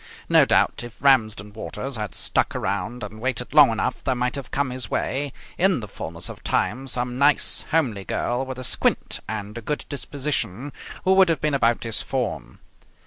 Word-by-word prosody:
No - - +6
doubt, - - +2
if 120 -1 -10
Ramsden 110 -7 +3
Waters 115 +4 -5
had 105 -3 -4
stuck - - 0
around 105 +5 -2
and 110 +2 -8
waited 125 0 -2
long 150 -3 +8
enough 115 +3 -2
there 130 - +1
might 125 +1 0
have 140 -2 -5
come 140 -2 -1
his 125 -4 -5
way 140 +1 -1 0.3
in 190 -2 +3
the 105 - -7
fullness 85 -2 -4
of - - -10
time 125 +8 0
some 125 0 0
nice, 145 +1 +3
homely 125 -12 +1
girl 120 +6 -1
with 130 -1 -6
a 130 - -6
squint - - +2
and 105 0 -5
a - - -10
good 150 +6 -3
disposition 140 -4 -3 0.3
who 190 - +4
would 190 -2 +6
have 165 -4 +1
been 150 +1 0
about 120 -4 +2
his 115 -2 0
form. 130 -3 -3
125 Hz, 190 wpm, -24 LUFS, 110-140 Hz, 0.3 s, long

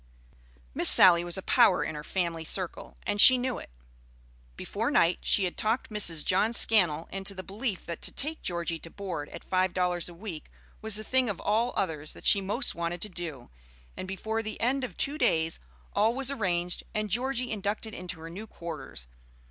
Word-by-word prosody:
Miss - - +5
Sally 175 -2 +8
was 175 +1 +1
a 190 - -5
power 230 -7 +4
in - - -4
her 150 0 -7
family 170 -2 -2
circle, 180 +2 -3
and 205 0 +2
she 255 - +10
knew 250 0 -2
it. - - -11 0.9
Before - - -3
night 170 +1 +3
she 200 - +3
had 180 - -2
talked 225 +2 -1
Mrs. 170 -7 +1
John 210 +5 +2
Scannell 175 -10 +3
into 195 +1 -4
the 185 - -7
belief 205 0 -4
that 170 - -6
to - - -1
take 310 +3 -2
Georgie 170 -2 -2
to 165 - -7
board 185 -6 -6
at - - -10
five 185 -1 0
dollars 180 -1 -1
a 175 - -12
week 175 -4 -8 0.3
was 220 -1 +2
the 215 - 0
thing 255 0 +1
of 200 - -4
all 225 +4 0
others 155 -5 -3
that - - -14
she 200 - +6
most 210 +7 0
wanted 170 +1 -3
to 210 - -3
do; 165 - -7 0.4
and 185 - -6
before 220 +4 -3
the 215 -1 -7
end 265 +3 0
of 225 -9 -6
two 290 +2 -1
days 160 - +1 0.3
all 220 +3 +2
was 270 0 +1
arranged, 180 -8 -1
and 215 -1 -2
Georgie 255 +1 0
inducted 215 +1 -3
into 180 -2 -6
her 165 - -8
new 205 +6 -8
quarters. 165 - -8
190 Hz, 195 wpm, -28 LUFS, 170-220 Hz, 0.9 s, she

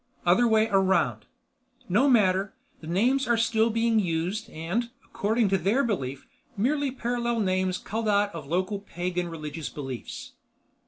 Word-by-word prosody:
"Other 185 +8 +4
way 220 -1 +3
around." 190 - +2 0.6
"No 235 +10 +3
matter. 195 -5 +3 0.2
The 155 - -11
names 245 +10 +2
are 235 -1 +3
still 225 0 +2
being 230 0 +2
used 185 +4 -2
and, 185 +9 -3 0.2
according 220 +1 0
to 195 0 +2
their 215 +11 +2
belief, 140 - -3 0.3
merely 280 +6 +1
parallel 240 -2 -2
names 185 -1 0
culled 220 +1 -4
out 205 -1 +2
of 155 -4 -7
local 185 +5 -1
pagan 180 -2 -3
religious 155 -1 -6
beliefs." 135 -4 -7
200 Hz, 145 wpm, -26 LUFS, 175-230 Hz, 0.6 s, Other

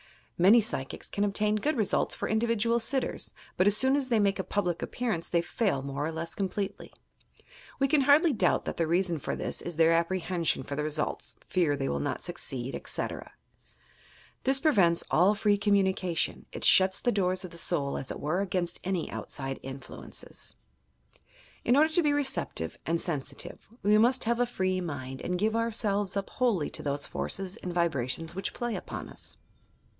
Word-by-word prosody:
Many 195 +7 +7
psychics 165 - -4
can 205 - 0
obtain 210 +1 +1
good 295 +7 0
results 215 -3 +1
for - - -3
individual 230 +1 +2
sitters, 260 +3 -1 0.2
but 185 - +3
as 205 +1 +5
soon 265 +1 +4
as 275 -2 0
they 230 -3 +3
make 200 -1 +2
a - - 0
public 180 -5 -1
appearance 220 -9 -2
they 170 -1 +2
fail 175 - 0
more 140 +1 -3
or - - -3
less 165 +1 -5
completely. 195 0 -3 0.9
We 275 - +3
can 285 +1 +4
hardly 290 +4 +5
doubt 190 -6 +2
that - - -4
the 165 - +1
reason 175 -1 +1
for - - -3
this - - -2
is 175 - -5
their 165 +1 +5
apprehension 170 -2 +1
for 140 - -5
the 150 - -1
results, 150 0 -3
fear 170 -6 +2
that 140 - -3
they 135 - 0
will - - -1
not 145 -3 -2
succeed, 135 -7 -4
etc. - - -4 1.1
This 270 0 +3
pre 310 +2 +4
vents 175 - +3
all 185 +6 +5
free 205 -1 +2
communication: 190 -4 +1
it - - -7
shuts 190 0 +5
the 245 - +1
doors 185 -2 0
of 180 - -9
the 170 - -7
soul, 145 -6 0
as 130 - -4
it - - -5
were, 165 +6 0
against 180 -3 -2
any 185 -3 -2
outside 135 -1 -4
influences. 135 -1 -8 1.1
In 245 - +4
order 310 +3 +5
to 345 - +4
be 295 -2 +2
receptive 265 - -2
and 165 +1 +1
sensitive, 155 -7 -5 0.2
we 210 +1 +5
must 245 +3 +3
have 235 +1 +1
a 245 - +3
free 185 -5 0
uiind, 135 -6 -5
and 180 - -1
give 215 +4 +1
ourselves 210 -4 0
up 195 - -3
wholly 225 -12 +1
to - - -6
those 145 0 -2
forces 195 +1 -3
and 180 - -5
vibra 165 -8 0
tions 165 +5 -2
which 195 +2 -3
play 240 -2 -2
upon - - -6
us. - - -8
190 Hz, 190 wpm, -29 LUFS, 165-220 Hz, 1.1 s, Many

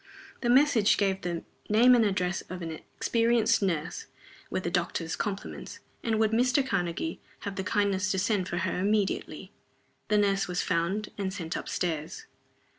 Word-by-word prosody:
The 240 - 0
message 250 -5 +5
gave 195 -1 +1
the 175 -2 -3 0.3
name 235 +4 +6
and 240 -2 +5
address 190 -3 0
of 180 -1 -6
an 165 - -4
experienced 230 +7 +1
nurse 170 -5 -2 0.4
with 185 - -2
the 170 - -2
doctor's 170 -2 -1
compliments, 200 -2 -5 0.3
and 225 -2 +1
would 220 -1 +3
Mr. 255 +4 +2
Karnegie 170 -4 -2 0.2
have 200 -1 -5
the 190 - -2
kindness 200 -1 +1
to 190 - 0
send 190 -1 0
for 175 - -2
her 180 0 -1
immediately. 205 +1 -1 0.6
The 210 - +3
nurse 200 -1 +2
was 180 0 -1
found 185 +5 -1
and 190 -1 -1
sent 175 -4 -5
up - - -4
stairs. 160 -3 -3
195 Hz, 165 wpm, -28 LUFS, 180-215 Hz, 0.6 s, name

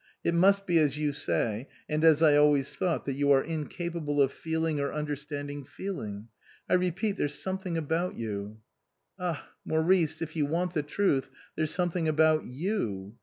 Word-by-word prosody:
It 170 - +1
must 195 +3 +4
be 175 -3 +3
as 150 -2 +2
you 150 -1 0
say, 120 -3 -1 0.2
and 155 +1 -1
as 160 -1 +6
I 150 -2 +6
always 145 -2 +4
thought, 180 -4 -1
that 140 - -1
you 140 +1 0
are 135 -1 +5
incapable 160 -1 -3
of 135 -1 +4
feeling 160 -1 -2
or 140 0 -1
understand 145 -1 -4
ing 145 0 -6
feeling. 115 - -6 0.4
I - - 0
repeat, 185 +3 +1
there's 145 0 -1
something 190 -2 -3
about 165 +3 -1
you 105 -1 -5 0.2
" - - -53
" - - -39
Ah, 175 -4 -3 0.2
Maurice, 160 -1 +2
if 160 -1 -5
you 150 -3 +1
want 175 +3 -1
the 155 - +1
truth, 145 -3 0 0.3
there's 155 -1 0
something 175 -2 0
about 155 0 +3
you. 120 - -3
155 Hz, 180 wpm, -29 LUFS, 145-170 Hz, 0.4 s, as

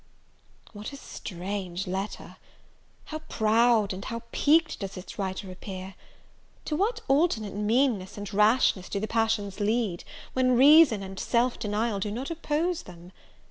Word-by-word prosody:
What 210 +3 -7
a 280 - -8
strange 190 -4 -5
letter! 190 +2 -5 0.7
how 310 - -6
proud 220 -1 +3
and 190 +1 -7
how 230 +2 -5
piqued 320 +3 +3
does 195 -1 -6
its 185 +4 -9
writer 190 0 -3
appear! 185 0 -8 0.7
To 305 - -1
what 440 +7 0
alternate 270 - +2
meanness 210 -1 +1
and 205 0 -6
rashness 210 -2 +3
do 200 - -2
the 215 - -3
passions 220 -3 0
lead, 210 -4 0 0.3
when 255 -1 +3
reason 280 -5 +7
and 190 0 -7
self 240 +1 +1
denial 210 0 -1
do 205 - -2
not 250 +9 -4
oppose 330 +1 -1
them! 175 0 -13
215 Hz, 140 wpm, -27 LUFS, 195-255 Hz, 0.7 s, reason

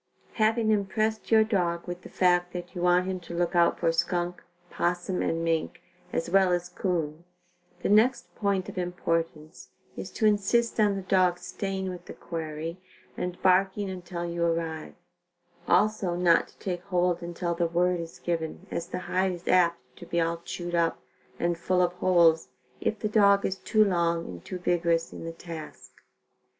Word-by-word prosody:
Having 220 0 +2
impressed 215 +2 0
your 220 -1 +6
dog 175 -6 0
with 175 0 -5
the - - -11
fact 180 -1 +2
that 175 0 -6
you 175 - -5
want 180 +1 +4
him 190 -1 -3
to 170 -1 -9
look 175 0 0
out 170 -1 +4
for 165 -1 +2
skunk, 175 +1 -1 0.3
possum 175 +1 -1
and 165 0 -1
mink, 165 -1 -1 0.3
as 165 - -1
well 190 +1 +4
as 175 0 0
'coon, 165 -4 -2 0.6
the - - +1
next 220 +6 +3
point 200 -3 0
of - - -5
importance 165 -3 -3 0.3
is - - -6
to 220 - -1
insist 215 +3 +2
on 205 -2 +4
the 195 - -4
dog 185 -2 +3
staying 190 0 -4
with 180 - -9
the - - -9
quarry 165 +1 -5 0.4
and 180 0 -4
barking 190 +1 +3
until 175 -1 -5
you 170 0 -2
arrive; 165 -2 -2 0.7
also 190 -1 +2
not 175 -1 +4
to - - -22
take 180 -2 -4
hold 180 -2 +1
until 170 0 -3
the 170 0 0
word 175 +1 +1
is 165 -1 -7
given 170 +1 -3
as 170 - -3
the - - -4
hide 185 +1 0
is 175 0 -10
apt 170 -2 +4 0.2
to - - -11
be 170 - 0
all 165 0 +1
chewed 175 +1 -6
up 170 -1 +1 0.4
and 170 0 0
full 180 +1 +2
of 175 0 0
holes 170 -3 +4 0.3
if 215 - -1
the 215 - -2
dog 200 -2 +4
is 190 - -1
too 215 +1 +3
long 170 -3 +1
and 90 -2 -9
too 185 - -5
vigorous 170 -2 0
in - - -8
the 165 - -4
task. 165 -1 -9
175 Hz, 180 wpm, -27 LUFS, 170-190 Hz, 0.7 s, your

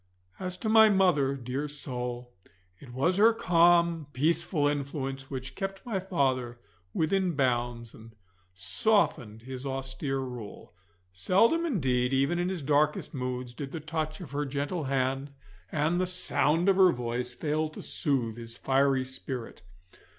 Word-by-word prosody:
As 185 -1 -4
to 220 - -4
my 220 0 +7
mother, 175 -9 +3
dear 130 +3 -4
soul, 125 -4 -5 0.5
it 130 - -12
was 140 +9 +1
her 220 +3 +7
calm, 170 -5 +3
peaceful 150 +2 +1
influence 135 -2 -3
which 130 -1 -6
kept 195 -1 -5
my 220 -6 -1
father 130 -10 -1 0.3
within 175 - 0
bounds, 120 -3 -1
and 110 0 -14 0.4
softened 110 - 0
his 130 0 -7
austere 135 0 -3
rule. 125 -9 -7 0.4
Seldom 230 - +3
indeed, 130 - +1
even 140 +6 +2
in 175 +1 0
his 180 -6 -4
darkest 150 +3 +1
moods, 125 -2 -4
did 135 +2 -6
the 165 - -3
touch 155 0 -3
of 160 - -9
her 145 +1 -1
gentle 145 +4 -3
hand 135 +1 -1 0.4
and 160 +4 +1
the 185 - 0
sound 180 -2 +1
of 195 -1 +4
her 185 -2 +7
voice 120 -1 -3
fail 155 +3 -1
to 155 - -10
soothe 125 - 0
his 115 0 -8
fiery 135 -1 +2
spirit. 130 -2 -7
140 Hz, 145 wpm, -29 LUFS, 125-170 Hz, 0.5 s, my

